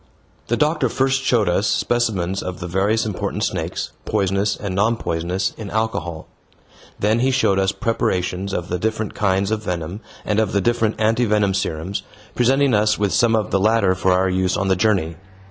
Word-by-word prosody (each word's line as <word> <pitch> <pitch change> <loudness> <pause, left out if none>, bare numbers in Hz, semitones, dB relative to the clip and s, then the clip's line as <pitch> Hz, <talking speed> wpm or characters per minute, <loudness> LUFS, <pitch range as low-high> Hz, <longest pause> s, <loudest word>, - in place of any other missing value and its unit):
The 120 - 0
doctor 150 -3 +1
first 135 +3 +1
showed 120 -5 +2
us 90 +4 +1
specimens 100 -6 0
of 90 -1 -5
the 90 - -5
various 100 +6 +1
important 105 -4 -3
snakes, - - -3
poisonous 100 +2 0
and 100 -2 -5
non 105 +5 +2
poisonous, 90 +2 -2
in 105 -3 -7
alcohol. 90 -7 -2 0.7
Then 110 +3 +2
he 130 +2 +2
showed 125 -7 +2
us 95 0 +2
preparations 95 -4 -1
of 90 -2 -3
the 90 - -2
different 110 +1 -2
kinds 95 0 0
of 110 -1 -1
venom 90 0 -4 0.3
and 105 0 +1
of 110 -3 0
the 100 - +2
different 115 +1 +1
anti 110 +3 +2
venom 105 -2 +2
serums, 95 0 -2 0.3
presenting 135 +2 +3
us 105 0 +3
with 100 -3 0
some 115 +2 +3
of 110 -2 -1
the 95 - +2
latter 105 -2 +3
for 95 0 +1
our 95 +1 +3
use 95 0 0
on 95 0 -1
the 95 - +4
journey. 90 -5 +1
100 Hz, 185 wpm, -21 LUFS, 95-110 Hz, 0.7 s, the